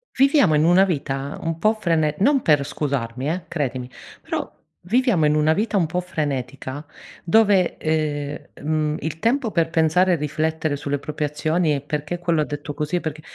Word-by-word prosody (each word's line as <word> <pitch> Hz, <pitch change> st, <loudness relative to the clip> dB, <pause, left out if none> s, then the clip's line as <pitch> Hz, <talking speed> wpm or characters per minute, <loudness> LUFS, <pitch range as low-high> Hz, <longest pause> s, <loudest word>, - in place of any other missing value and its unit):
Viviamo 275 Hz, -, +4 dB
in 150 Hz, -, +3 dB
una 175 Hz, +3 st, +6 dB
vita 140 Hz, -5 st, -2 dB
un 165 Hz, 0 st, -3 dB
po' 215 Hz, +5 st, +3 dB
frene 165 Hz, -7 st, 0 dB
non 275 Hz, +6 st, +3 dB
per 145 Hz, -3 st, +3 dB
scusarmi 135 Hz, -3 st, -3 dB
eh, 175 Hz, +2 st, -3 dB
credimi, 130 Hz, -6 st, -3 dB, 0.4 s
però -, -, -4 dB, 0.3 s
viviamo 220 Hz, -, +2 dB
in 150 Hz, -, +2 dB
una 155 Hz, +1 st, +3 dB
vita 210 Hz, +3 st, 0 dB
un 175 Hz, -, +3 dB
po' 180 Hz, +3 st, -2 dB
frenetica 140 Hz, -4 st, -4 dB, 0.4 s
dove, 195 Hz, -1 st, +3 dB
ehm, 150 Hz, -2 st, -1 dB, 0.2 s
mhmm, 155 Hz, 0 st, 0 dB
il 160 Hz, +2 st, -4 dB
tempo 235 Hz, 0 st, +1 dB
per 165 Hz, -3 st, +1 dB
pensare 170 Hz, +3 st, +3 dB
e -, -, +4 dB
riflettere 155 Hz, 0 st, -1 dB
sulle 145 Hz, 0 st, -2 dB
proprie 150 Hz, +2 st, -5 dB
azioni 155 Hz, +2 st, 0 dB
e 140 Hz, -, -3 dB
"Perché 150 Hz, +3 st, -3 dB
quello 170 Hz, -2 st, +1 dB
ha 150 Hz, -, 0 dB
detto 145 Hz, 0 st, -6 dB
così? 150 Hz, +4 st, -2 dB
E -, -, +2 dB
perché" 155 Hz, -1 st, -5 dB
155 Hz, 180 wpm, -22 LUFS, 145-175 Hz, 0.4 s, una